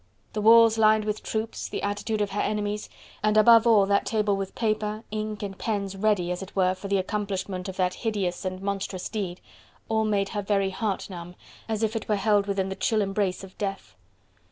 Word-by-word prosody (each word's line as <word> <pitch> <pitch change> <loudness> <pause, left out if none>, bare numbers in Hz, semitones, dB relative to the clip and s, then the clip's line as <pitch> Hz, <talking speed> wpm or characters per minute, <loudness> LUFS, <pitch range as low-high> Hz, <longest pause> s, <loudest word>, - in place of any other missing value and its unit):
The 215 - -2
walls 225 +1 +7
lined 215 -1 +4
with 215 0 -2
troops, 220 0 -3
the - - -4
attitude 210 +2 -1
of 205 - -1
her 205 - -1
enemies, 210 0 -2 0.3
and 215 0 +2
above 230 +1 +7
all 215 -4 +6
that 200 0 +2
table 210 -2 +1
with 195 -1 -5
paper, 215 -1 -1
ink 215 -1 -4
and 195 -1 -4
pens 200 -2 -2
ready 195 -3 +1
as 180 - -3
it 195 - -9
were 185 -1 +3
for 195 +2 -8
the 200 0 +2
accomplishment 190 -1 -3
of 190 - -7
the 185 -1 +3
hideous 195 -3 -2
and 185 0 -4
monstrous 195 -2 -3
deed, 190 -5 -4 0.5
all 220 0 +2
made 200 -2 +1
her 210 - -2
very 195 -1 +1
heart 200 +1 -2
numb, 175 0 -8 0.3
as 220 0 -1
if 220 +1 0
it 220 - -4
were 210 - +3
held 205 0 +2
within 195 -1 -1
the 190 - -4
chill 220 +2 +1
embrace 195 -1 -1
of 190 -1 -11
death. 195 -1 -4
205 Hz, 205 wpm, -26 LUFS, 195-215 Hz, 0.5 s, walls